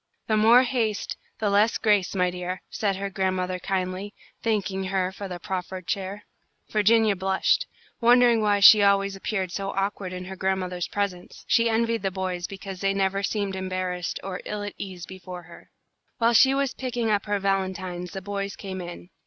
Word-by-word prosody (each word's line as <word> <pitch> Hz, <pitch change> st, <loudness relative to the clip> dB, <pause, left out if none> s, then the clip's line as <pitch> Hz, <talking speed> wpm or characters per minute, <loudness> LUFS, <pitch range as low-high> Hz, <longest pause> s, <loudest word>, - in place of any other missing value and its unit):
"The 215 Hz, -, +1 dB
more 230 Hz, +4 st, +6 dB
haste, 235 Hz, -5 st, -1 dB, 0.2 s
the 210 Hz, -2 st, 0 dB
less 210 Hz, +3 st, +3 dB
grace, 205 Hz, -4 st, +2 dB
my 180 Hz, -1 st, +2 dB
dear," 180 Hz, +1 st, -5 dB
said 200 Hz, -3 st, 0 dB
her 195 Hz, +1 st, -4 dB
grandmother, 185 Hz, -2 st, -1 dB
kindly, 190 Hz, +2 st, -3 dB, 0.3 s
thanking 195 Hz, -4 st, -1 dB
her 185 Hz, -1 st, 0 dB
for 200 Hz, +1 st, -7 dB
the 180 Hz, -1 st, -5 dB
proffered 185 Hz, 0 st, -5 dB
chair. 195 Hz, +2 st, -3 dB, 0.5 s
Virginia 215 Hz, 0 st, +4 dB
blushed, 190 Hz, -, +1 dB, 0.3 s
wondering 240 Hz, -1 st, +5 dB
why 205 Hz, -1 st, +2 dB
she 200 Hz, +2 st, +10 dB
always 200 Hz, 0 st, +3 dB
appeared 195 Hz, -2 st, -2 dB
so 195 Hz, +1 st, -3 dB
awkward 195 Hz, -1 st, -2 dB
in 180 Hz, 0 st, -6 dB
her 190 Hz, +1 st, -7 dB
grandmother's 185 Hz, -2 st, -1 dB
presence. 195 Hz, -3 st, -4 dB
She 230 Hz, -1 st, +4 dB
envied 230 Hz, 0 st, +1 dB
the 195 Hz, -, 0 dB
boys 185 Hz, -2 st, -3 dB
because 195 Hz, -1 st, -8 dB
they 195 Hz, 0 st, +1 dB
never 195 Hz, 0 st, +1 dB
seemed 200 Hz, -1 st, -1 dB
embarrassed 185 Hz, -2 st, -3 dB
or 190 Hz, -1 st, -5 dB
ill 210 Hz, -1 st, -4 dB
at 205 Hz, -, -5 dB
ease 185 Hz, -3 st, -6 dB
before 180 Hz, -1 st, -9 dB
her. 170 Hz, 0 st, -15 dB, 0.5 s
While 230 Hz, 0 st, +3 dB
she 265 Hz, +4 st, +6 dB
was 275 Hz, -2 st, 0 dB
picking 245 Hz, -3 st, -2 dB
up 205 Hz, 0 st, 0 dB
her 205 Hz, 0 st, +1 dB
valentines 185 Hz, -2 st, -2 dB
the 195 Hz, -2 st, -6 dB
boys 200 Hz, 0 st, -3 dB
came 190 Hz, -2 st, -6 dB
in. 175 Hz, +1 st, -9 dB
195 Hz, 180 wpm, -25 LUFS, 185-210 Hz, 0.5 s, she